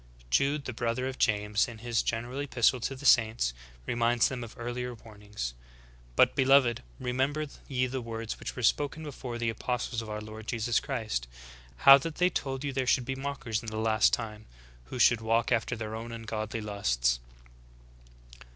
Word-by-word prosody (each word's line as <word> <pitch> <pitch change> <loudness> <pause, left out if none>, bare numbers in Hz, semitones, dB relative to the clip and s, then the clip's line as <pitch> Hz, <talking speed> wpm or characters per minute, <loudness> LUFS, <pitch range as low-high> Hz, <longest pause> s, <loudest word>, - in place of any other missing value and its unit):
'"^ - - -26 0.2
33. - - -26
Jude, 140 - +2
the 130 - -4
brother 120 +2 -1
of 130 0 -6
James, 105 -2 +2
in 120 - -9
his 115 0 0
general 120 +4 -3
epistle 130 -3 +2
to 135 +3 -3
the 140 +2 -10
saints, 110 - +4 0.3
reminds 120 - +2
them 125 -2 -4
of 115 - -10
earlier 120 +1 -4
warnings: 105 - -7 0.6
"Bur - - +8
beloved, 130 -3 +3 0.2
remember 135 +5 0 0.2
ye 130 -2 +1
the 130 0 -3
words 115 -1 -5
which - - -6
vvere 125 - 0
spoken 145 +5 +1
before 130 -5 -6
of 120 - -6
the 115 -1 +1
apostles 120 0 -2
of 110 - -8
our 105 0 -3
Lord 110 +1 -9
Jesus 120 0 +1
Christ. 110 - -3 0.6
How 135 0 +11
that 160 +2 -5
they 180 +1 +3
told 135 -4 -3
you 140 -1 -2
there 130 -1 -1
should 125 0 +3
be 135 - -2
mockers 135 -5 -3
in 115 - -10
the 110 0 -4
last 110 0 +3
time, 110 -2 -3 0.4
who 125 - -7
should 120 -2 +5
walk 115 +2 +1
after 120 0 +1
their 110 -1 -5
own 115 +1 -6
ungodly 110 -1 -4
lusts.""' - - 0
120 Hz, 190 wpm, -29 LUFS, 110-130 Hz, 0.6 s, How